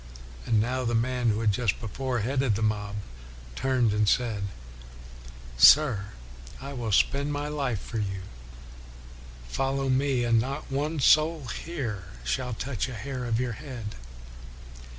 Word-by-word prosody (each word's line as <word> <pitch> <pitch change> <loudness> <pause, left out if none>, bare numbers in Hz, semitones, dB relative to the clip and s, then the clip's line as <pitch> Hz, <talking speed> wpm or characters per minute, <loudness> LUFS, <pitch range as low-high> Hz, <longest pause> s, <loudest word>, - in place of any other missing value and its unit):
And 110 - +3
now 125 +4 0
the 120 -1 0
man 120 +1 +1
who 110 +1 0
had 110 -2 +3
just 115 -1 0
before 120 +2 -3
headed 130 -1 +1
the 110 - -1
mob, 105 -1 -1 0.6
turned 125 - +2
and 105 -1 +2
said, 110 -5 +1 0.6
' - - -15
Sir, 120 - +7 0.5
I 140 +1 -7
will 120 -4 -3
spend 140 +8 +2
my 145 0 -2
life 135 -8 -1
for 115 - -5
you; 95 -2 -3 1.2
follow 135 - -1
me 130 -1 +2
and 115 -1 +3
not 135 +4 -5
one 150 +3 -1
soul 155 +1 +4
here 115 - -4 0.2
shall 125 - -2
touch 130 0 -3
a 125 - -6
hair 125 +3 -5
of 115 -1 0
your 125 -2 -1
head.' 120 -5 -7
120 Hz, 150 wpm, -27 LUFS, 105-135 Hz, 1.2 s, Sir